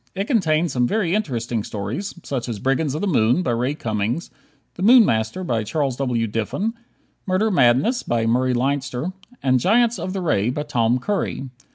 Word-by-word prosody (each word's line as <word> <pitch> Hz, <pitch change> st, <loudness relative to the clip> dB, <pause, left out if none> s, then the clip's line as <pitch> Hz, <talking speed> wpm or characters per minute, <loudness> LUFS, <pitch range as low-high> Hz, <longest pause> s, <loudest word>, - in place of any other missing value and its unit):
It 195 Hz, -, -1 dB
contained 170 Hz, -, +1 dB
some 125 Hz, -1 st, +1 dB
very 195 Hz, -, 0 dB
interesting 120 Hz, -, -1 dB
stories, 110 Hz, -, -5 dB
such 125 Hz, -3 st, -4 dB
as 115 Hz, -, -3 dB
"Brigands 135 Hz, +5 st, 0 dB
of 155 Hz, -, -3 dB
the 205 Hz, -, 0 dB
Moon," 125 Hz, -, +2 dB
by 125 Hz, -, 0 dB
Ray 125 Hz, +5 st, 0 dB
Cummings, 110 Hz, +4 st, -2 dB, 0.4 s
"The -, -, -10 dB
Moon 235 Hz, +3 st, +7 dB
Master," 110 Hz, +9 st, -1 dB
by 115 Hz, -9 st, -1 dB
Charles 135 Hz, +2 st, -1 dB
W. 125 Hz, -4 st, 0 dB
Diffin, 115 Hz, -, -2 dB, 0.5 s
"Murder 195 Hz, +4 st, +1 dB
Madness," 140 Hz, -, +3 dB
by 115 Hz, -1 st, -1 dB
Murray 125 Hz, +2 st, +2 dB
Leinster, 135 Hz, +4 st, -1 dB, 0.3 s
and 130 Hz, -1 st, +3 dB
"Giants 235 Hz, -, +3 dB
of 185 Hz, -, -4 dB
the 195 Hz, -, -3 dB
Ray," 115 Hz, -, +1 dB
by 145 Hz, +4 st, -2 dB
Tom 120 Hz, -4 st, +1 dB
Curry. 200 Hz, -1 st, -2 dB
135 Hz, 180 wpm, -22 LUFS, 120-185 Hz, 0.5 s, Moon